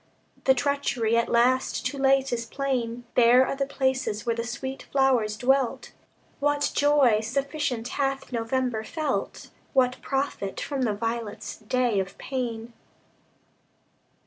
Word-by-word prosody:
The 265 Hz, -, +5 dB
treachery, 250 Hz, -4 st, 0 dB
at 235 Hz, 0 st, +2 dB
last, 250 Hz, +2 st, +2 dB
too 275 Hz, +2 st, -2 dB
late, 270 Hz, -1 st, +3 dB
is 235 Hz, -1 st, -2 dB
plain; 245 Hz, -3 st, -2 dB
Bare 245 Hz, +2 st, +6 dB
are -, -, -2 dB
the 275 Hz, 0 st, -1 dB
places 260 Hz, -6 st, -1 dB
where 230 Hz, -1 st, +1 dB
the 230 Hz, -, -2 dB
sweet 265 Hz, +3 st, -5 dB
flowers 250 Hz, -6 st, +2 dB
dwelt. 265 Hz, +1 st, +1 dB, 0.5 s
What 290 Hz, 0 st, +1 dB
joy 285 Hz, -7 st, +4 dB
sufficient 260 Hz, +1 st, -2 dB
hath 270 Hz, -1 st, -2 dB
November 235 Hz, -1 st, -1 dB
felt? 310 Hz, +6 st, -3 dB, 0.2 s
What 255 Hz, -2 st, +2 dB
profit 270 Hz, -8 st, -2 dB
from 280 Hz, -2 st, -3 dB
the 220 Hz, -5 st, +1 dB
violet's 220 Hz, -1 st, -4 dB
day 235 Hz, -1 st, 0 dB
of 190 Hz, 0 st, -4 dB
pain? 235 Hz, -3 st, -4 dB
255 Hz, 130 wpm, -26 LUFS, 230-270 Hz, 0.5 s, Bare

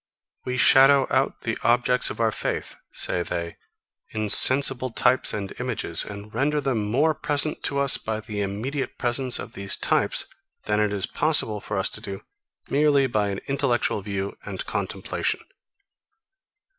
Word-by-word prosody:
We 125 Hz, 0 st, -4 dB
shadow 135 Hz, +2 st, +5 dB
out 135 Hz, +1 st, -1 dB
the 115 Hz, -, -3 dB
objects 125 Hz, +1 st, +2 dB
of -, -, -8 dB
our 115 Hz, -1 st, +1 dB
faith, -, -, -5 dB, 0.2 s
say 90 Hz, -, -1 dB
they, 85 Hz, -1 st, -5 dB, 0.5 s
in 110 Hz, -1 st, -4 dB
sensible 130 Hz, +1 st, +7 dB
types 125 Hz, +2 st, +1 dB
and 100 Hz, -2 st, -6 dB
images, 120 Hz, -9 st, +2 dB
and 105 Hz, +1 st, -10 dB
render 150 Hz, +2 st, -1 dB
them 115 Hz, -7 st, -3 dB
more 150 Hz, +8 st, +1 dB
present 150 Hz, 0 st, 0 dB
to 140 Hz, -, -2 dB
us 140 Hz, -1 st, +3 dB
by 110 Hz, -1 st, -4 dB
the 105 Hz, -1 st, -6 dB
immediate 115 Hz, +8 st, -5 dB
presence 125 Hz, +1 st, 0 dB
of -, -, -9 dB
these 100 Hz, 0 st, 0 dB
types, -, -, 0 dB, 0.4 s
than 105 Hz, 0 st, -1 dB
it 105 Hz, -1 st, 0 dB
is 100 Hz, -2 st, +1 dB
possible 145 Hz, -9 st, 0 dB
for 105 Hz, -, -5 dB
us 95 Hz, -, 0 dB
to -, -, -9 dB
do 100 Hz, 0 st, -8 dB, 0.4 s
merely 145 Hz, -1 st, +2 dB
by 105 Hz, -5 st, -1 dB
an 100 Hz, 0 st, -5 dB
intellectual 135 Hz, -6 st, -1 dB
view 100 Hz, 0 st, -5 dB
and -, -, -6 dB
contemplation. -, -, -4 dB
120 Hz, 155 wpm, -23 LUFS, 105-135 Hz, 0.5 s, sensible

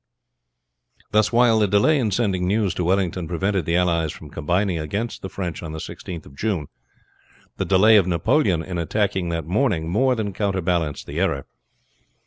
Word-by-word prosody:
Thus, 110 Hz, 0 st, +3 dB
while 120 Hz, -2 st, +4 dB
the 105 Hz, -, +3 dB
delay 105 Hz, +10 st, +3 dB
in 115 Hz, -5 st, +1 dB
sending 95 Hz, -4 st, 0 dB
news 100 Hz, -1 st, +1 dB
to 90 Hz, -, -2 dB
Wellington 90 Hz, -1 st, 0 dB
prevented 95 Hz, +1 st, -1 dB
the 85 Hz, -, 0 dB
allies 85 Hz, -3 st, +1 dB, 0.2 s
combining 90 Hz, +4 st, 0 dB
against 100 Hz, +10 st, -4 dB
the 95 Hz, -, -6 dB
French 90 Hz, -5 st, -5 dB
on 80 Hz, -3 st, -6 dB
the -, -, -5 dB
16th 80 Hz, +1 st, -7 dB
of 70 Hz, -, -15 dB
June, 90 Hz, -4 st, -2 dB, 0.9 s
the -, -, -1 dB
delay 105 Hz, +3 st, +6 dB
of 95 Hz, -3 st, +3 dB
Napoleon 85 Hz, -, +1 dB
in 90 Hz, -1 st, -4 dB
attacking 95 Hz, 0 st, -1 dB
that 85 Hz, -2 st, -3 dB
morning 90 Hz, -, 0 dB
more 130 Hz, +8 st, +2 dB
than 105 Hz, -3 st, -3 dB
counterbalanced 90 Hz, -6 st, -1 dB
the -, -, -5 dB
error. 70 Hz, -1 st, 0 dB
95 Hz, 165 wpm, -22 LUFS, 85-105 Hz, 0.9 s, delay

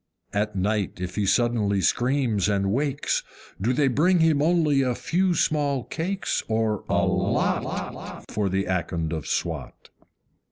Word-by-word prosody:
At 105 Hz, +1 st, -1 dB
night 100 Hz, +1 st, 0 dB
if 90 Hz, 0 st, -4 dB
he 105 Hz, -2 st, 0 dB
suddenly 105 Hz, -1 st, +2 dB
screams 120 Hz, -2 st, +1 dB
and 100 Hz, -1 st, +1 dB
wakes, 140 Hz, +4 st, 0 dB, 0.4 s
Do 115 Hz, +5 st, +2 dB
they 140 Hz, +2 st, +2 dB
bring 160 Hz, +9 st, +3 dB
him 160 Hz, -3 st, +3 dB
only 155 Hz, -3 st, +3 dB
a 125 Hz, -2 st, 0 dB
few 180 Hz, +5 st, +1 dB
small 145 Hz, -4 st, +1 dB
cakes, 185 Hz, +8 st, -2 dB
or 110 Hz, -2 st, 0 dB
a -, -, +2 dB
LOT, -, -, -2 dB
For 100 Hz, -2 st, 0 dB
the 95 Hz, +1 st, 0 dB
Akond 85 Hz, -3 st, -2 dB
of 80 Hz, -3 st, -4 dB
Swat? -, -, -4 dB
120 Hz, 145 wpm, -25 LUFS, 100-145 Hz, 0.4 s, bring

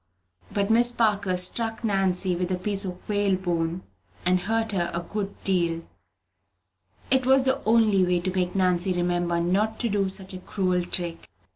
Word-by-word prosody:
But 200 Hz, +1 st, 0 dB
Miss 240 Hz, +2 st, +5 dB
Parker 205 Hz, -5 st, +1 dB
struck 225 Hz, +5 st, +1 dB
Nancy 190 Hz, -3 st, +2 dB
with 180 Hz, +1 st, -2 dB
a -, -, +1 dB
piece 195 Hz, +2 st, 0 dB
of 180 Hz, -1 st, -8 dB
whalebone, 185 Hz, -4 st, -1 dB, 0.4 s
and 180 Hz, 0 st, +3 dB
hurt 225 Hz, +4 st, -1 dB
her 175 Hz, -3 st, -1 dB
a 170 Hz, -, -2 dB
good 200 Hz, +2 st, -5 dB
deal. 170 Hz, -3 st, 0 dB, 1.3 s
It 260 Hz, -1 st, +3 dB
was 265 Hz, 0 st, +5 dB
the 265 Hz, +1 st, 0 dB
only 215 Hz, -3 st, +4 dB
way 180 Hz, -1 st, +1 dB
to 185 Hz, +1 st, -3 dB
make 180 Hz, 0 st, -1 dB
Nancy 185 Hz, 0 st, +1 dB
remember 175 Hz, -1 st, 0 dB
not 200 Hz, +6 st, 0 dB
to 235 Hz, -, 0 dB
do 200 Hz, -2 st, 0 dB
such 190 Hz, 0 st, 0 dB
a 185 Hz, -, -6 dB
cruel 185 Hz, -1 st, -1 dB
trick 175 Hz, -2 st, -2 dB
again. -, -, -19 dB
190 Hz, 170 wpm, -25 LUFS, 180-210 Hz, 1.3 s, Miss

